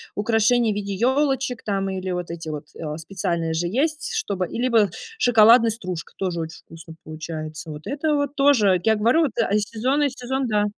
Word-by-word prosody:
украшение 225 +1 +2
в - - -7
виде 200 -1 -3
ёлочек 265 +1 0
там, 195 -2 -1
или 190 0 -4
вот 180 -1 -4
эти 165 -2 -6
вот, 150 -1 -5
э, 150 -1 -5
специальные 170 -1 -2
же 175 +2 -1
есть, 305 - -1
чтобы 195 - -2
и 230 - -6
либо 230 -5 +3 0.3
шоколадная 230 - +6
стружка- 185 -7 -4
тоже 180 -3 -2
очень 160 0 -7
вкусно 165 0 -12
получается. 155 0 -7
Вот 150 0 -9
это 295 +2 0
вот 285 0 -1
тоже, 240 -10 +4
я 220 -1 +3
говорю 235 +10 +3
вот, 285 -7 +1
а 215 -3 +1
сезонный 260 +7 0
сезон- 260 +1 -3
да. 210 -2 +1
210 Hz, 185 wpm, -23 LUFS, 175-255 Hz, 0.3 s, шоколадная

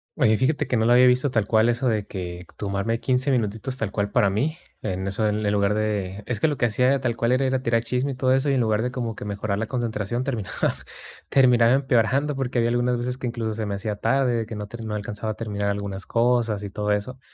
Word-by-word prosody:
Oye, 110 -8 +3
fíjate 145 +5 +1
que, 125 - +1
no 110 - +2
lo 120 - +5
había 125 +1 +7
visto 125 +3 +3
tal 115 -5 +1
cual 110 +2 +3
eso 120 +2 0
de 105 -3 -1
que 90 -2 -6
tomarme 100 +3 -1
15 130 +1 0
minutitos 120 +1 -1
tal 115 -5 -2
cual 100 0 -1
para 105 -6 +3
mí, 145 +11 -1 0.2
en 95 0 -3
eso, 100 +3 0
en 105 0 -1
el 100 - +1
lugar 100 0 +2
de 105 -2 -2
es 115 -2 -3
que 160 - +3
lo 145 - -1
que 125 - +2
hacía 125 +4 +2
tal 120 -3 -1
cual 115 +2 +1
era 135 +1 +2
ir 130 - 0
a 130 - +2
tirar 115 -2 +1
el 115 - -7
chisme 130 +3 -1
y - - -8
todo 130 0 +2
eso, 135 +2 +2
y - - +2
en 125 - +2
lugar 110 -1 +1
de 125 - -1
como 120 -3 -3
que - - -8
mejorar 100 0 -2
la 115 - -2
concentración, 120 -1 -2
terminaba 115 -8 -1 0.6
terminaba 125 -3 +5
empeorando, 135 +2 +2
porque 130 -2 -2
había 115 0 +3
algunas 120 0 +1
veces 125 +1 -3
que 125 - -3
incluso 115 -2 -3
se 110 -1 -3
me 100 - -2
hacía 105 +1 -3
tarde, 135 +1 +1
de 115 -1 -1
que 115 - -6
no 105 0 -5
ter 115 +1 -8
no 105 -1 -3
alcanzaba 105 +1 -4
a - - -16
terminar 105 -3 -2
algunas 100 -1 -4
cosas 115 -3 +1
y 100 - -6
todo 105 0 -2
eso, 105 +6 -2
115 Hz, 265 wpm, -24 LUFS, 105-125 Hz, 0.6 s, había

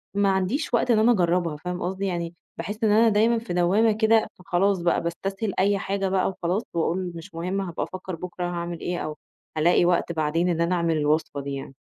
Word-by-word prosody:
ما 200 -1 +3
عنديش 195 - -1
وقت 240 +1 +3
إن 220 - +4
أنا 225 +3 +5
أجربها، 175 -5 +1
فاهم 180 +3 -5
قصدي، 190 +2 -2
يعني 170 -3 -2 0.2
باحِسّ 205 +7 -5
إن 215 - +4
أنا 225 +2 +5
دايمًا 220 +2 +3
في 225 -6 -6
دوامة 190 +6 +3
كده، 220 +1 +3
فخلاص 190 0 +1
بقى 170 0 +1
باستسهِل 195 +4 -3
أي 200 +1 +3
حاجة 195 0 -1
بقى 190 -1 +1
وخلاص، 185 +3 -2
وأقول 175 +2 -1
مش 165 0 -10
مُهم 180 +4 -2
هابقى 175 -4 -3
أفكّر 185 -1 -6
بُكرة 180 +2 -6
هاعمل 170 -1 -4
إيه، 175 0 -3
أو 155 0 -4 0.4
هالاقي 170 +3 +4
وقت 175 -1 +1
بعدين 165 +2 0
إن 170 -1 0
أنا 170 +2 +2
أعمل 170 -2 +1
الوصفة 150 -1 0
دي 140 0 -5
يعني. 135 0 -7
180 Hz, 205 wpm, -25 LUFS, 170-200 Hz, 0.4 s, أنا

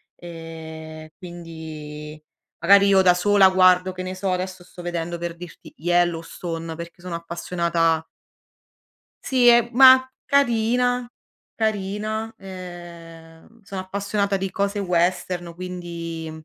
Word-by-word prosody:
Ehm, 160 -2 -9
quindi 160 -4 -9 0.4
magari 200 0 +6
io 195 -1 +5
da 180 -1 +5
sola 195 +1 +5
guardo, 185 0 +4
che 185 0 -6
ne 185 0 -5
so, 185 0 -2
adesso 185 0 -4
sto 175 0 -12
vedendo 175 0 -3
per 170 0 -5
dirti, 175 -2 -12
"Yellowstone" 165 -1 -1
perché 170 +1 -10
sono 180 -1 -5
appassionata 170 -1 -1 1.2
Sì, 255 -2 +3
è 235 -1 +6
mah, 260 +1 +8 0.2
carina, 245 -1 +2 0.5
carina. 215 +1 -2
Ehm, 175 0 -11
sono 195 -1 -6
appassionata 200 +1 -1
di 195 0 -3
cose 200 +1 -1
western, 180 -1 -1
quindi, 170 -2 -6
180 Hz, 115 wpm, -23 LUFS, 165-200 Hz, 1.2 s, mah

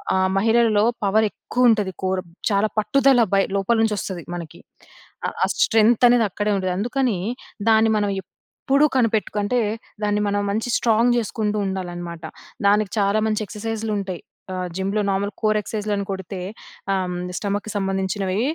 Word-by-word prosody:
ఆహ్, 185 0 +2
మహిళలలో 220 -1 +3 0.2
పవరెక్కువ 220 +4 +2
ఉంటది. 210 -4 +1
కోర్ 185 0 0 0.3
చాలా 200 +2 +2
పట్టుదల 260 +4 +4
బై 195 - +4
లోపల 200 +4 +1
నుంచొస్తది 195 -5 -2
మనకి. 170 -3 -8 0.7
ఆ - - 0
ఆ - - +6 0.2
స్ట్రెంగ్తనేది 230 +1 +5
అక్కడే 205 +3 -1
ఉండేది. 185 -1 -1
అందుకనీ 245 +1 0 0.5
దాన్ని 220 0 +5
మనం 205 -1 +1
ఎప్పుడూ 275 - -1
కనిపెట్టుకంటే 220 -1 +1 0.4
దాన్ని 210 0 +1
మనం 205 0 0
మంచి 220 +4 -1
స్ట్రాంగ్ 235 +1 +3
జేసుకుంటూ 215 -2 -1
ఉండాలనమాట. 175 -3 -5 0.4
దానికి 205 -1 +3
చాలా 200 +1 +2
మంచి 215 0 0
ఎక్సర్సైజ్‌లుంటయి. 210 -3 -4 0.3
ఆహ్, 185 0 -3
జిమ్‌లో 195 +3 0
నార్మల్ 200 +1 -1
కోర్ 215 -1 +2
ఎక్సర్సైజ్‌లని 210 -1 -3
కొడితే 190 0 -5 0.5
ఆహ్, 190 -1 0
హ్మ్. 180 0 -4 0.2
స్టమక్‌కి 205 +1 -3
సంబంధించినవీ 195 0 -1
205 Hz, 135 wpm, -22 LUFS, 195-220 Hz, 0.7 s, ఆ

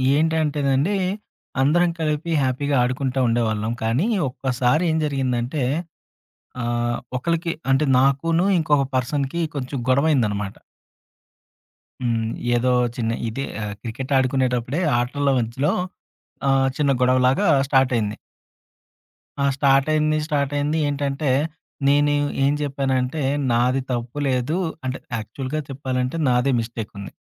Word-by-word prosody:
ఏంటంటేనండి. 155 +1 +1 0.6
అందరం 170 +6 +3
కలిపి 155 +1 -1
హ్యాపీగా 140 +2 0
ఆడుకుంటా 130 +1 -1
ఉండేవాళ్ళం. 110 -2 0
కానీ, 120 - +1 0.2
ఒక్కసారి 130 +4 0
ఏం 160 - +1
జరిగిందంటే 130 -1 -1 1.0
ఆహ్, 120 0 -1 0.2
ఒకళ్ళకి 170 +5 -1 0.2
అంటే 135 +3 +3
నాకునూ, 140 +7 +2
ఇంకొక 145 -3 +2
పర్సన్‌కి 135 +5 -1
కొంచెం 135 0 -4
గొడవ 140 +4 +3
అయిందనమాట. 105 -7 0 1.5
హ్మ్. 115 -2 0 0.3
ఏదో 125 +1 +2 0.2
చిన్న 115 -2 -1 0.2
ఇదే 135 +5 -4 0.2
ఆహ్, 105 -1 -4
క్రికెట్ 130 +4 -4
ఆడుకునేటప్పుడే 130 +3 0 0.2
ఆటల 140 +4 0
మధ్యలో 120 +5 0 0.8
ఆహ్, 135 0 +3
చిన్న 145 -2 +2
గొడవలాగా 130 +8 +3 0.2
స్టార్టయింది. 125 -6 +2 1.2
ఆ! 140 - +2
స్టార్టయింది. 150 +3 +3
స్టార్టయింది. 145 0 0
ఏంటంటే, 140 0 -1 0.6
నేను 145 +1 +4 0.3
ఏం 140 - +3
చెప్పానంటే 135 0 -1 0.3
నాది 125 +3 +2
తప్పు 120 +3 -3
లేదు. 130 +6 0 0.3
అంటే 130 0 -3 0.2
యాక్చువల్‌గా 130 +7 -4
చెప్పాలంటే 130 0 -2
నాదే 125 +2 +2
మిస్టేకుంది. 110 -3 -6
135 Hz, 105 wpm, -22 LUFS, 125-145 Hz, 1.5 s, నేను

